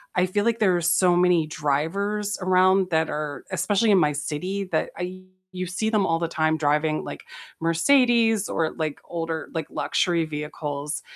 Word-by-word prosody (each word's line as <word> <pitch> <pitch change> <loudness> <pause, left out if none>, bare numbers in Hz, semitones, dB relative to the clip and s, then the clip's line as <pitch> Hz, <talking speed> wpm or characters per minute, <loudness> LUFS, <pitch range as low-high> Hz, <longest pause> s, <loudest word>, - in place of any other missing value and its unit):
I 180 0 +3
feel 205 +3 -1
like 230 0 +1
there 190 -4 +3
are 175 - 0
so 175 +1 +3
many 175 -3 +3
drivers 195 +9 -1
around 185 0 +3
that 160 0 +1
are 150 -3 -4
especially 210 +1 +1
in 190 - +5
my 150 -2 +3
city, 175 +7 -3
that 155 - +1
I 185 +1 -6 0.3
you 185 0 -4
see 180 +5 -2
them 210 -3 +2
all 165 -1 +1
the 170 - -1
time 155 -1 0
driving, 150 +1 +1
like, - - -7 0.4
Mercedes, 225 +5 +3
or, 160 -1 0
like, 155 -2 -3
older, 165 -1 -4
like, 160 -2 -2
luxury 170 -3 0
vehicles, 150 -1 -5
175 Hz, 170 wpm, -24 LUFS, 155-195 Hz, 0.4 s, in